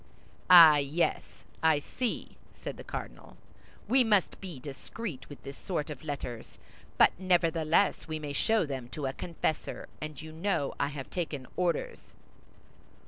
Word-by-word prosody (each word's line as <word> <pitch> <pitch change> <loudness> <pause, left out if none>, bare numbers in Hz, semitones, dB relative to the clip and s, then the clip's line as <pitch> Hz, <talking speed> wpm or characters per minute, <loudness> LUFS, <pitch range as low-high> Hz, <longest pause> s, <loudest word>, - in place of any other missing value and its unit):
"Ah, 165 -4 +10
yes, 145 +4 +1 0.4
I 160 -2 +5
see," 235 - -4 0.2
said - - -6
the - - -9
cardinal; - - -8 0.5
"we 260 +1 +5
must 210 -5 +2
be 180 -8 -7
discreet 140 - -7
with 145 - -11
this 140 0 -9
sort 155 -5 -3
of 145 - -8
letters; 125 - -6 0.4
but - - +7
nevertheless, 170 -1 +2
we 155 -1 -3
may 150 -2 -5
show 220 +4 +2
them 135 -4 -5
to 145 +1 -5
a 135 - -1
confessor, 160 -1 -3
and 155 -1 -6
you 155 0 -8
know 160 -3 -1
I 140 - +2
have 140 -2 -7
taken 155 -7 -3
orders." 180 - -2
155 Hz, 145 wpm, -30 LUFS, 145-180 Hz, 0.5 s, Ah